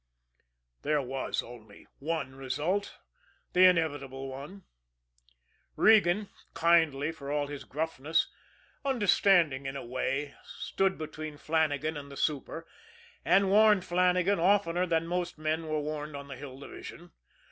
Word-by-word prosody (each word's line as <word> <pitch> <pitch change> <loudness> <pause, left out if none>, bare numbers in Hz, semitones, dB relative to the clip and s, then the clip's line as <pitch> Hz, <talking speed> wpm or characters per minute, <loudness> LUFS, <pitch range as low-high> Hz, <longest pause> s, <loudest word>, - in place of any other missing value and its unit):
There 150 0 +1
was 130 +1 -2
only 110 -4 -13
one 150 -3 -3
result 150 +9 -2 0.6
the 185 +1 +7
inevitable 145 -6 +1
one. 145 +9 -9 1.1
Regan, 210 -2 +4 0.3
kindly 160 -3 +3
for 140 -3 -7
all 145 0 0
his 145 -1 -7
gruffness, 160 +1 -1 0.6
understanding 195 - +3
in 135 - -4
a 135 - -6
way, 135 +3 -2
stood 195 0 -1
between 155 -1 -6
Flannagan 155 -1 0
and 140 -1 -9
the 140 - -9
super 155 +2 -2 0.6
and 195 0 +4
warned 210 -2 +5
Flannagan 180 +2 +2
oftener 180 -1 +2
than 165 -1 +1
most 175 0 -2
men 155 +1 -2
were 155 0 -1
warned 150 0 -5
on 140 0 -8
the 135 - -6
Hill 130 0 -9
Division. 140 - -10
155 Hz, 125 wpm, -30 LUFS, 140-180 Hz, 1.1 s, the